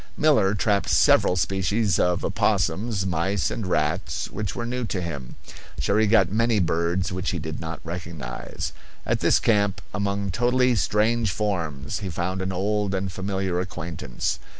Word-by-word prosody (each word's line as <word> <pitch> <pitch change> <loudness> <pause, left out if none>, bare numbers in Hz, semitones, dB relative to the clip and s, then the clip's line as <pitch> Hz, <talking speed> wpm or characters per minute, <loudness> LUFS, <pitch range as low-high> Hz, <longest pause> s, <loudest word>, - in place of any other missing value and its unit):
Miller 110 -10 +4
trapped 100 -1 +1
several 90 - +5
species 95 +2 +1
of 90 0 +1
opossums, 100 +2 0
mice 95 +2 0
and 110 -5 -3
rats 80 +2 -1
which 105 -1 -4
were 120 - -3
new 125 +1 -2
to 105 -4 -2
him. 70 -8 -5 0.4
Cherrie 105 +2 +2
got 100 -4 +4
many 115 +1 +2
birds 85 +1 0
which 90 +1 -2
he 95 - -1
did 80 -1 -5
not 80 0 -5
recognize. 80 -7 -5 0.3
At - - +1
this - - +4
camp, 100 -4 +2
among 100 0 -1
totally 125 +4 +3
strange 110 +1 +2
forms, 85 -8 -2
he 100 -3 -4
found 90 +2 -2
an 95 0 -2
old 100 +2 0
and 95 0 -2
familiar 95 -1 -2
acquaintance. 85 -8 -3
95 Hz, 150 wpm, -25 LUFS, 85-105 Hz, 0.4 s, several